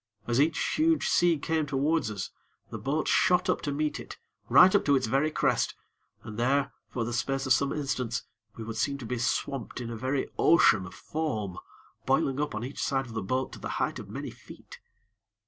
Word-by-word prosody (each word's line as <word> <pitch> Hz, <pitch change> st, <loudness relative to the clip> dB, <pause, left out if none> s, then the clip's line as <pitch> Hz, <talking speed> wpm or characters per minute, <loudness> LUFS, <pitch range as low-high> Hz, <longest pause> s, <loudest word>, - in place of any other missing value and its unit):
As 120 Hz, +2 st, +2 dB
each 160 Hz, +2 st, +2 dB, 0.2 s
huge 320 Hz, +1 st, +2 dB
sea 175 Hz, -2 st, +3 dB
came 155 Hz, +1 st, -1 dB
towards 145 Hz, 0 st, +1 dB
us, 100 Hz, -3 st, -5 dB, 0.4 s
the -, -, -5 dB
boat 150 Hz, +3 st, -1 dB
shot 180 Hz, 0 st, +3 dB
up -, -, -2 dB
to 145 Hz, -, -2 dB
meet 150 Hz, +1 st, -1 dB
it, -, -, -9 dB, 0.3 s
right 185 Hz, +1 st, +8 dB
up 205 Hz, -, +4 dB
to 145 Hz, -, +4 dB
its 130 Hz, -, +1 dB
very 135 Hz, +7 st, +1 dB
crest, -, -, +1 dB, 0.5 s
and 110 Hz, +1 st, -7 dB
there, 135 Hz, +3 st, +2 dB, 0.2 s
for 120 Hz, -, -2 dB
the 120 Hz, -, -4 dB
space 135 Hz, +3 st, -1 dB
of 130 Hz, -, +4 dB
some 140 Hz, +3 st, +1 dB
instants, 130 Hz, -5 st, -2 dB, 0.3 s
we 115 Hz, -, -7 dB
would 110 Hz, 0 st, -6 dB
seem 140 Hz, +5 st, 0 dB
to 130 Hz, -, -8 dB
be 125 Hz, +1 st, -3 dB
swamped 125 Hz, +1 st, -2 dB
in 120 Hz, -1 st, -5 dB
a -, -, -4 dB
very 130 Hz, +4 st, -1 dB
ocean 105 Hz, -, +5 dB
of -, -, -12 dB
foam, 110 Hz, -, -3 dB, 0.5 s
boiling 135 Hz, +1 st, +2 dB
up 150 Hz, -6 st, -2 dB
on 110 Hz, -, -3 dB
each 130 Hz, +3 st, -5 dB
side 135 Hz, -1 st, 0 dB
of 120 Hz, -, -10 dB
the 110 Hz, -, -2 dB
boat 130 Hz, +7 st, -2 dB
to -, -, -9 dB
the -, -, -5 dB
height -, -, -1 dB
of -, -, -9 dB
many -, -, -5 dB
feet. -, -, -14 dB
135 Hz, 210 wpm, -28 LUFS, 120-150 Hz, 0.5 s, right